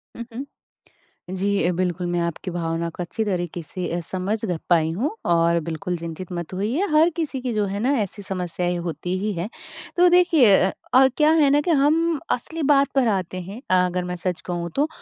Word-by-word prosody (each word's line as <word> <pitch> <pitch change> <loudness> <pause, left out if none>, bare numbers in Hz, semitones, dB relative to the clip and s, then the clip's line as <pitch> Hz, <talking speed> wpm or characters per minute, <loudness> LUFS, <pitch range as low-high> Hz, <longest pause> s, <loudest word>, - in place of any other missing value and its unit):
उ - - -7
उ - - -4 1.0
जी, 195 -2 +1
बिल्कुल, 180 -1 -1
मैं 175 0 0
आपकी 170 +2 -4
भावना 170 -1 -2
को 165 - -8
अच्छी 220 +6 -3
तरीक़े 175 -3 -2
से 180 +3 -5
अ, - - -1
समझ 185 +5 -2
ग 180 -5 -1
पाई 160 -2 +3
हूँ 230 - -1 0.2
और 170 0 +3
बिल्कुल 170 +3 -3
चिंतित 170 +2 -7
मत 175 0 -5
होइए 220 - 0
हर 310 +2 +5
किसी 300 -6 -3
की 250 -2 -2
जो 210 -1 +1
है 200 +1 -3
ना 250 +6 +1
ऐसी 205 +1 -5
समस्याएँ 180 -2 -2
होती 175 +2 -3
ही 210 +2 -1
हैं। 175 +3 -3 0.5
तो 355 +1 +6
देखिए 335 - +6 0.4
अ, 265 +1 +7
क्या 305 0 +5
है 280 - +5
ना 290 +1 +4
कि 340 - 0
हम 315 +2 +3
असली 320 +6 -2
बात 280 -1 +5
पर 265 -3 +3
आते 185 -3 -1
हैं 195 +7 -8
अ 185 0 +4
अगर 180 0 -2
मैं 180 0 -4
सच 180 0 -3
कहूँ 175 -1 -3
तो 290 +2 +2
185 Hz, 205 wpm, -23 LUFS, 175-260 Hz, 1.0 s, अ